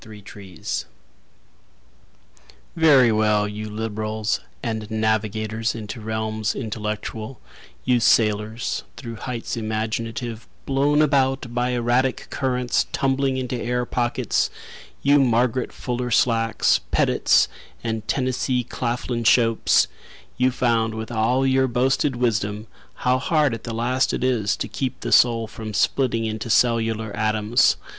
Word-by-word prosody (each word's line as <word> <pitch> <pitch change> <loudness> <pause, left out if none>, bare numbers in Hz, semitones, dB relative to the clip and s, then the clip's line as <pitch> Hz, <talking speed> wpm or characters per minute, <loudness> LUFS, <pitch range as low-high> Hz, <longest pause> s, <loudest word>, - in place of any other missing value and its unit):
Thomas 105 -2 -12
Rhodes 95 -4 -5 1.9
Very 140 -7 +6
well, 105 -1 +2
you 105 +1 -6
liberals, 110 0 -2 0.2
And 110 -3 -3
navigators 110 0 -1
into 110 +1 -7
realms 110 0 -2
intellectual, 110 +1 -5 0.5
You 125 -1 +3
sailors 110 0 +1 0.2
through 115 -4 -7
heights 120 0 -4
imaginative, 115 +1 -3 0.2
Blown 145 +2 +3
about 135 -4 +1
by 125 +1 0
erratic 125 +1 0
currents, 125 -2 0
tumbling 135 0 0
into 125 -1 -3
air 125 +1 -1
pockets, 120 -1 0 0.5
You 145 +1 +5
Margaret 125 -1 +1
Fuller 125 0 -3
Slacks, 115 -1 +2
Petits, - - +3 0.4
And 110 -1 -3
Tennessee 130 -1 0
Claflin 120 0 -3
Shopes— 115 0 +4 0.5
You 125 0 +3
found 115 -3 0
with 110 +1 -6
all 120 +4 +1
your 130 0 +3
boasted 130 +3 +1
wisdom 110 -3 -1 0.3
How 125 +1 +1
hard 150 -2 +2
at 115 - -6
the 120 - -4
last 125 +3 +1
it - - -4
is 115 -6 +1
To - - -3
keep 130 -2 -4
the - - -4
soul 115 -2 +5
from 110 -1 -7
splitting 115 +1 +1
into 110 +1 -4
cellular 115 -2 +1
atoms. 110 +1 +2
115 Hz, 120 wpm, -23 LUFS, 110-125 Hz, 1.9 s, Very